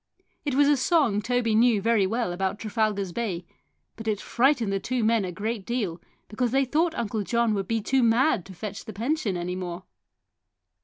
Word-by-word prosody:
It 285 -3 -1
was 285 +1 +5
a 290 -1 +4
song 260 - +2
Toby 245 0 0
knew 230 -1 +4
very 215 -2 +2
well 225 -3 -1
about 190 +2 -2
Trafalgar's 215 -3 -1
Bay, 180 -4 -3 0.5
but 225 -1 -8
it 210 -2 0
frightened 240 -4 +1
the 195 - 0
two 245 +4 -2
men 225 -1 +3
a 185 - -3
great 215 +3 -3
deal 195 -7 -3 0.3
because 240 +3 -1
they 270 +3 +2
thought 320 +5 0
Uncle 220 -2 -2
John 235 +2 +1
would 195 -2 -2
be 225 -1 0
too 265 +5 +2
mad 235 - +3
to 190 - -10
fetch 200 +2 -6
the 220 - -7
pension 230 - -1
any 175 +1 -3
more. 180 -1 -5
225 Hz, 195 wpm, -26 LUFS, 195-245 Hz, 0.5 s, was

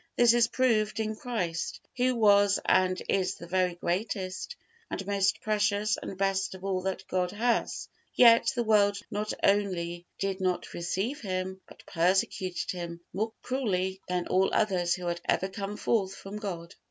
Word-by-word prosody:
This 240 -1 +6
is 240 -1 +4
proved 225 -4 +1
in 215 0 -1
Christ, 195 -9 -3 0.2
Who 255 0 +2
was 205 -3 +5
and 185 0 +3
is 190 -2 +1
the 170 - -10
very 180 0 +1
greatest 185 - -3 0.3
and 190 - -4
most 195 -1 +1
precious 210 0 +1
and 190 - -7
best 195 -1 0
of 190 - -12
all 190 -1 0
that 190 0 -4
God 180 -1 0
has; 230 +4 -1 0.3
yet 235 -2 +7
the 240 - +1
world 205 -2 +4
not 210 0 -2
only 175 -4 +1
did 195 -1 -2
not 185 -1 -1
receive 190 - -2
Him, 190 -2 -3
but - - -16
persecuted 185 +1 0
Him 170 -1 -6
more 215 +4 -1
cruelly 190 -7 -1
than 180 -1 -1
all 190 +1 +2
others 180 -5 +2
who 180 -1 -7
had 170 0 -2
ever 190 - +1
come 200 +2 -5
forth 195 -4 0
from 195 +2 -8
God. 175 -5 -6
195 Hz, 165 wpm, -29 LUFS, 185-215 Hz, 0.3 s, yet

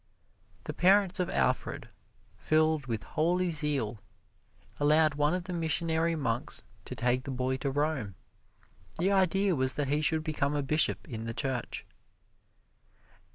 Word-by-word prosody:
The - - -5
parents 190 +1 +3
of 180 - 0
Alfred, 65 -2 -1 0.5
filled 155 -2 +1
with 110 -3 -3
holy 175 +3 0
zeal, 140 -8 +1 0.8
allowed 155 +1 +4
one 150 +3 +1
of 180 - -3
the 180 +1 -6
missionary 165 0 0
monks 120 -6 -2 0.2
to - - -7
take 125 +1 0
the - - -8
boy 130 0 -1
to 140 - -2
Rome. 140 - -1 0.8
The 185 +4 +1
idea 195 0 +2
was 130 -1 +1
that 140 +1 -2
he 145 +2 +1
should 160 0 +2
become 150 -2 -1
a 145 - 0
bishop 150 +3 +1
in 115 -5 -6
the 115 0 -5
Church. 130 -3 -2
150 Hz, 145 wpm, -30 LUFS, 130-165 Hz, 0.8 s, allowed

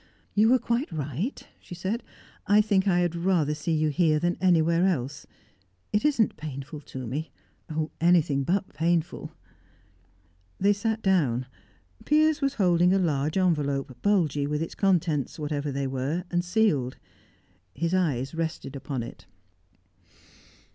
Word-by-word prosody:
"You 215 +2 +4
were 255 - +6
quite 240 +1 -1
right," 155 - -4
she 175 - -10
said. 190 +7 -2 0.5
"I 205 +1 +5
think 205 -2 +2
I 180 -2 +3
had 175 -2 0
rather 170 -4 +1
see 155 +2 -2
you 155 0 +2
here 155 0 +2
than 175 +3 0
anywhere 170 -1 +3
else. 145 -4 -2 0.7
It 210 - +2
isn't 270 -8 +2
painful 145 0 -7
to 130 -3 -7
me 145 +7 -4 0.4
oh! 155 0 -2
anything 165 -5 +3
but 190 +6 0
painful!" 165 +2 -1 1.3
They 200 +2 +4
sat 220 +2 -2
down. 140 -11 +2 0.6
Piers 310 +1 +3
was 275 0 0
holding 180 -2 +3
a - - +4
large 155 -3 0
envelope, 140 -7 0
bulgy 160 -9 +2
with 150 +2 -1
its 165 - -6
contents, 170 -8 +1
whatever 145 -1 -3
they 140 0 -2
were, 135 +6 -2
and 175 0 +1
sealed; 175 - +1 0.8
his 170 +1 -1
eyes 145 -8 0
rested 160 -4 -4
upon 135 -2 -4
it. 100 -7 -11
165 Hz, 140 wpm, -26 LUFS, 145-190 Hz, 1.3 s, were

